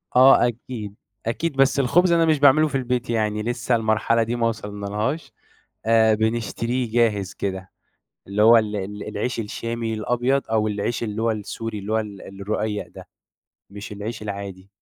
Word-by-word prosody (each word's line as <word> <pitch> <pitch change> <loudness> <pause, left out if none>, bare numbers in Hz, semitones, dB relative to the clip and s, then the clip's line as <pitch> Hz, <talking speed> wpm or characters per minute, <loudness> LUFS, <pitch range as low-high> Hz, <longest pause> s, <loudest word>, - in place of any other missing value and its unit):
آه، 130 -1 +7
أكيد، 110 -3 -6 0.3
أكيد 150 +6 -2
بس 135 +1 +3
الخُبز 170 +7 +3
أنا 165 -1 +4
مش 155 -3 +2
باعملُه 145 +2 +6
في 140 - -5
البيت 125 -2 -1
يعني 105 -2 0
لِسّه 120 +1 0
المرحلة 115 +1 +2
دي 120 +2 -2
ما 115 -1 +1
وصلنالهاش 105 +6 -3 0.5
آآ، 110 -1 +5
بنشتريه 115 +2 -1
جاهز 105 -5 +1
كده، 95 -1 -4 0.6
اللي 100 +2 -1
هو 115 +2 +8
ال 105 -1 0
ال 105 +1 -5
العيش 110 +3 -3
الشامي 115 +1 -3
الأبيض، 120 +5 0
أو 110 -1 +2
العيش 105 +3 -2
اللي 110 0 -3
هو 115 0 +2
السوري 110 0 -5
اللي 100 +2 -6
هو 110 - +3
ال 100 -2 -8
الرقيّق 105 +1 -2
ده، - - -13 0.6
مش 100 +1 -8
العيش 105 +2 -6
العادي. 100 -2 -6
110 Hz, 160 wpm, -23 LUFS, 105-120 Hz, 0.6 s, هو